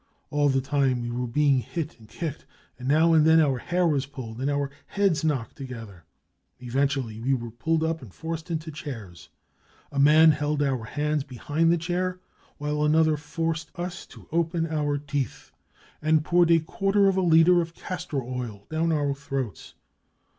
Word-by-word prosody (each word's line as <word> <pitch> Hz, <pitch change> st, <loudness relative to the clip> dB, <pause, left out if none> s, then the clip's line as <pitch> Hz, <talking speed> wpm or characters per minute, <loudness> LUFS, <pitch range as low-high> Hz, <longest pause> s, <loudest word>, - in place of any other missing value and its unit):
All 145 Hz, -1 st, +3 dB
the 135 Hz, -1 st, +2 dB
time 135 Hz, -3 st, +1 dB
we 120 Hz, -, -3 dB
were 125 Hz, +1 st, -2 dB
being 140 Hz, +2 st, +3 dB
hit 155 Hz, +2 st, -5 dB
and 110 Hz, -, -17 dB
kicked, 160 Hz, -3 st, -5 dB, 0.3 s
and 125 Hz, -, -6 dB
now 160 Hz, +4 st, +4 dB
and 155 Hz, -1 st, +6 dB
then 160 Hz, +1 st, +6 dB
our 140 Hz, -5 st, +2 dB
hair 175 Hz, +6 st, 0 dB
was 145 Hz, -4 st, +1 dB
pulled 125 Hz, -4 st, -8 dB
and 135 Hz, -, 0 dB
our 140 Hz, -1 st, -1 dB, 0.2 s
heads 195 Hz, -6 st, +1 dB
knocked 140 Hz, -8 st, -1 dB
together. 115 Hz, -, -9 dB, 0.3 s
" -, -, -49 dB
Eventually 130 Hz, -3 st, -1 dB
we 135 Hz, +3 st, +2 dB
were 120 Hz, -2 st, -5 dB
pulled 160 Hz, +7 st, 0 dB
up 160 Hz, 0 st, -1 dB
and 120 Hz, -7 st, -11 dB
forced 160 Hz, -, -6 dB
into 160 Hz, -1 st, -3 dB
chairs; 115 Hz, -, -8 dB, 0.6 s
a 140 Hz, -, -2 dB
man 155 Hz, +3 st, +7 dB
held 150 Hz, 0 st, 0 dB
our 130 Hz, -5 st, -1 dB
hands 150 Hz, +3 st, -1 dB
behind 145 Hz, +6 st, 0 dB
the 170 Hz, -, +3 dB
chair, 180 Hz, +2 st, -2 dB, 0.4 s
while 150 Hz, 0 st, -1 dB
another 155 Hz, +1 st, +4 dB
forced 160 Hz, +2 st, -3 dB
us 175 Hz, 0 st, -5 dB
to -, -, -15 dB
open 165 Hz, 0 st, 0 dB
our 150 Hz, -3 st, -1 dB
teeth 145 Hz, -2 st, -4 dB, 0.5 s
and 155 Hz, 0 st, +2 dB
poured 175 Hz, 0 st, +4 dB
a 165 Hz, -1 st, +6 dB
quarter 195 Hz, +5 st, +1 dB
of 195 Hz, -, +3 dB
a 190 Hz, -, +2 dB
litre 175 Hz, +1 st, +5 dB
of 165 Hz, 0 st, -6 dB
castor 150 Hz, -7 st, -4 dB
oil 120 Hz, -5 st, -6 dB
down 165 Hz, +1 st, +1 dB
our 145 Hz, -3 st, +1 dB
throats. 135 Hz, -5 st, -5 dB
150 Hz, 180 wpm, -26 LUFS, 135-165 Hz, 0.6 s, man